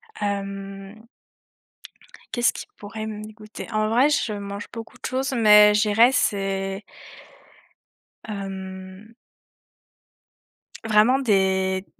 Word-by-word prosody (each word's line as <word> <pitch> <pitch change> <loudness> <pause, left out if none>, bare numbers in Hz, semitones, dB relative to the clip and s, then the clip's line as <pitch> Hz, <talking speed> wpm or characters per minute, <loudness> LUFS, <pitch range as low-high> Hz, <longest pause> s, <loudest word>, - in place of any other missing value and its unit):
Hem 195 +1 -5 1.3
qu'est-ce 240 -1 +2
qui - - -7
pourrait 215 +1 -7
me 215 -1 -6
dégoûter? 215 0 -10
En 215 -1 0
vrai, 250 +6 +4
je 285 -6 0
mange 200 0 -6
beaucoup 230 -1 -9
de - - -10
choses, 265 +1 -2
mais 210 -3 +7
je 210 - +3
dirais, 220 +3 +5
c'est 195 -3 -1 1.4
hem 190 0 -8 1.7
vraiment 220 +4 +4
des 190 -5 +1
210 Hz, 100 wpm, -23 LUFS, 195-220 Hz, 1.7 s, mais